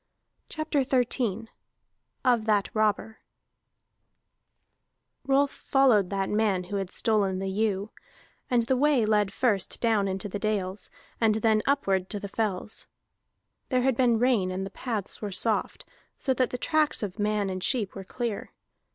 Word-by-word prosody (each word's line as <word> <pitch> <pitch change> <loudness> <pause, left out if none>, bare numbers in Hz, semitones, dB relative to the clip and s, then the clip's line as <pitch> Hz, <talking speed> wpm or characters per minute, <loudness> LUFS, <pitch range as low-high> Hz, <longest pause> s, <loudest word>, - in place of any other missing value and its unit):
CHAPTER 310 -2 -1
XIII 245 -4 0 0.8
OF 240 -4 +3
THAT 205 -2 +2
ROBBER 215 0 0 2.1
Rolf 275 +1 +3
followed 245 -9 +3
that 195 -1 -1
man 210 -3 +1
who 200 +3 -4
had 195 -2 -3
stolen 200 -4 +1
the 190 0 -3
ewe, 205 0 -1 0.6
and 245 -3 +3
the 260 +3 +1
way 275 -3 +3
led 210 -2 +2
first 215 -4 0
down 220 -4 +2
into 190 +1 -3
the 205 +1 -5
dales, 200 -2 -2 0.3
and 220 -2 +4
then 220 0 +2
upward 195 -10 +1
to 205 - -4
the 200 - -6
fells. 210 -1 -3 0.8
There 255 -2 +2
had 265 -1 +2
been 240 -2 +3
rain 230 -6 +2
and 185 +1 -3
the 195 - -7
paths 215 -3 -4
were 205 -2 -4
soft, 220 +3 -1 0.3
so 265 - 0
that 255 0 +1
the 250 - -4
tracks 305 -1 +1
of 200 0 -5
man 210 -1 0
and 185 -1 -4
sheep 225 -8 0
were 195 - -7
clear. 230 +1 -4
215 Hz, 150 wpm, -27 LUFS, 195-245 Hz, 2.1 s, and